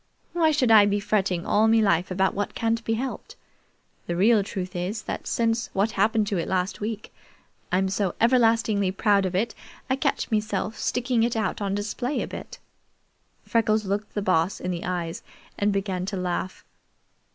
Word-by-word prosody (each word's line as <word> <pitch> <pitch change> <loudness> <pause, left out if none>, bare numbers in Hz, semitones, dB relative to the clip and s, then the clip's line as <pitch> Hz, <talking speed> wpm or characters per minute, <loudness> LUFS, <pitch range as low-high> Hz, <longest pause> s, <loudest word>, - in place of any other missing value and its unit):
Why 330 -2 +3
should 270 -6 +2
I 210 -2 +8
be 205 0 +1
fretting 195 -4 0
all 215 +2 +3
me 225 0 +5
life 190 -5 +2
about 190 +1 +1
what 205 +1 -3
can't 230 0 0
be 225 - 0
helped. 260 +3 -5 0.7
The 175 - -1
real 210 +4 +4
truth 185 -1 -5
is, 190 +5 -3
that - - -5
since 230 0 0
what 200 +3 +1
happened 215 +2 +2
to 195 - 0
it 165 - -3
last 185 +2 -1
week, 215 0 -5 0.6
I'm 190 +2 +2
so 190 -1 -1
everlastingly 225 -5 +3
proud 200 -1 +2
of 180 - -4
it 215 +5 0 0.4
I - - +4
catch 270 - -1
meself 215 -1 -1
sticking 245 -1 0
it 235 +1 +1
out 215 -2 -1
on 200 -1 -1
display 235 +7 -2
a - - -5
bit." - - -8 0.9
Freckles 220 -2 +2
looked 200 +2 -3
the 205 - -1
Boss 185 0 +1
in 180 - -3
the 170 -1 -4
eyes 175 +2 -3 0.4
and 205 +1 +2
began 190 -2 -2
to 195 - -3
laugh. 180 0 -3
205 Hz, 180 wpm, -25 LUFS, 190-225 Hz, 0.9 s, I